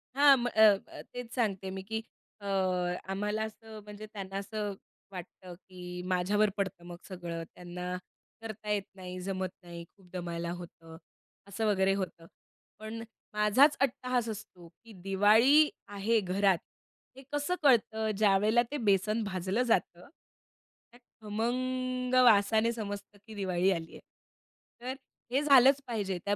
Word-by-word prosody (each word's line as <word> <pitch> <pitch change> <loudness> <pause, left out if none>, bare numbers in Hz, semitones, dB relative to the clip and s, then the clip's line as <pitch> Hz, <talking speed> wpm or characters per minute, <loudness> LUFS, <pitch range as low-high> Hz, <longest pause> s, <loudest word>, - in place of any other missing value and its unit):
हां, 280 0 +8
म 245 0 -1
अ, 220 -2 +4 0.2
अ, - - -10
तेच 245 -1 -7
सांगते 200 -6 0
आहे 190 - -5
मी, 190 - -5
की 220 +3 -3 0.4
अ, - - -10 0.7
आम्हाला 210 +2 -1
असं 220 0 -8
म्हणजे 210 +1 -9
त्यांना 195 -2 -5
असं 205 0 -3 0.4
वाटतं, 180 0 -9
की 180 -1 -9
माझ्यावर 190 +4 +2
पडतं 190 -3 -3
मग 175 0 -8
सगळं. 170 -3 -5
त्यांना 180 +1 -5 0.4
करता 215 -1 -7
येत 205 -2 +1
नाही, 185 -1 -7
जमत 190 0 -2
नाही, 170 -1 -8
खूप 185 +1 -24
दमायला 170 -1 -4
होतं. 165 -1 -12 0.5
असं 210 +3 -3
वगैरे 195 -2 +3
होतं. 185 -4 -4 0.5
पण 220 +1 -6 0.3
माझाच 210 +8 +5
अट्टाहास 250 -3 0
असतो, 185 -5 -9
की 220 +7 -18
दिवाळी 220 +10 +5 0.2
आहे 205 +3 +1
घरात, 195 -1 +2 0.6
हे 270 - -11
कसं 290 +5 0
कळतं? 220 -5 +3
ज्यावेळेला 210 +3 +4
ते 295 - -2
बेसन 210 +3 +2
भाजलं 190 +3 -1
जातं. 180 -6 0 0.8
त्या 245 - -18 0.2
खमंग 250 +3 -2
वासाने 220 0 +5
समजतं 205 -2 -6
की 220 - -10
दिवाळी 185 -1 +1
आली 165 -3 -3
आहे. - - -10 0.8
तर 255 +2 -3 0.4
हे 270 - +3
झालचं 275 -1 +6
पाहिजे, 205 -6 -2
त्या 205 0 +1
205 Hz, 140 wpm, -30 LUFS, 185-230 Hz, 0.8 s, हां